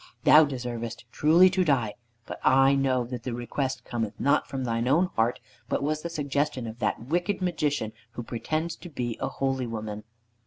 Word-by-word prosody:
Thou 155 +1 +8
deservest 120 -4 -5
truly 165 +5 +6
to 185 0 +2
die; 125 -10 +1 0.3
but - - -7
I 135 +1 +5
know 135 -2 +2
that 120 -1 -6
the 120 0 -4
request 130 +3 -3
cometh 110 -3 -3
not 140 +2 +2
from 135 -1 -4
thine 115 0 -1
own 170 +7 +3
heart, 115 +2 +1 0.3
but - - 0
was 155 +1 -1
the 170 - -4
suggestion 145 -4 -1
of 115 +1 -7
that 120 - -1
wicked 175 +8 0
Magician 150 - -1 0.2
who 120 - -5
pretends 155 +8 -3
to 175 - -10
be 120 -6 -3
a - - 0
holy 135 -2 -1
woman." 110 -2 -5
135 Hz, 185 wpm, -27 LUFS, 120-150 Hz, 0.3 s, Thou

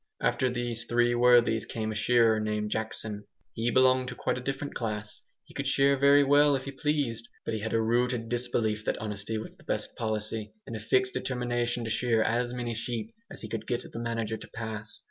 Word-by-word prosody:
After 130 - +1
these 120 -1 -1
three 120 0 +2
worthies 120 -2 +4
came 110 -1 -3
a - - -3
shearer 115 0 +4
named 105 -1 -2
Jackson; 110 -2 -3 0.3
he 115 +2 0
belonged 130 +1 +4
to 125 - -5
quite - - -1
a - - -8
different 135 +2 -3
class; 105 -2 -3 0.2
he - - -17
could 140 - -3
shear 140 +1 +4
very 140 +1 +6
well 145 +1 +5
if 130 - -2
he 140 - -4
pleased, 135 -5 -1 0.2
but - - -2
had 110 +2 -3
a 115 - +2
rooted 120 +1 +1
disbelief 115 -3 0
that - - 0
honesty 105 +1 -4
was 110 - -7
the - - -20
best - - -3
policy, 110 -1 -3
and 115 - -6
a - - -4
fixed 130 +4 +2
determination 120 -1 -1
to 110 - -3
shear 115 -2 +2
as 120 +2 0
many 120 -1 -3
sheep 120 - -4 0.2
as - - -9
he - - -4
could 110 0 -5
get 120 -1 -2
the - - -4
manager 115 -2 -2
to - - -11
pass. 110 -2 -6
115 Hz, 205 wpm, -29 LUFS, 110-125 Hz, 0.3 s, very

